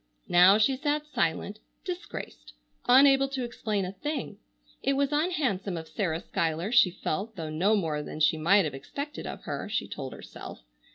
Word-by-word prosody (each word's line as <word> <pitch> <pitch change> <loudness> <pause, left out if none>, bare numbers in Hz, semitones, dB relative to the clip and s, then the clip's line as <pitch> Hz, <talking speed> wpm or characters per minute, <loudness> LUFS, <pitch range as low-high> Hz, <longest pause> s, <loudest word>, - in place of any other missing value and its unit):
Now 180 +3 +7
she 260 +5 +2
sat 295 +1 -1
silent, 205 - -1 0.3
disgraced, 360 -1 -7 0.3
unable 270 +2 +6
to 270 -2 -3
explain 215 -4 -2
a 180 - -4
thing. 295 +11 -5 0.4
It 275 - +1
was 280 +1 +1
unhandsome 285 - 0
of 160 0 -7
Sarah 170 -5 -2
Schuyler, 165 +4 -2
she 240 -6 +6
felt, 195 +5 -4
though 160 -4 -5
no 190 +8 +2
more 160 -7 -1
than 150 - -7
she 155 +1 +4
might 175 +5 +4
have 150 - -3
expected 285 - -6
of - - -7
her, - - -4
she 220 - -1
told 135 -2 -6
herself. - - -10
205 Hz, 170 wpm, -28 LUFS, 165-275 Hz, 0.4 s, Now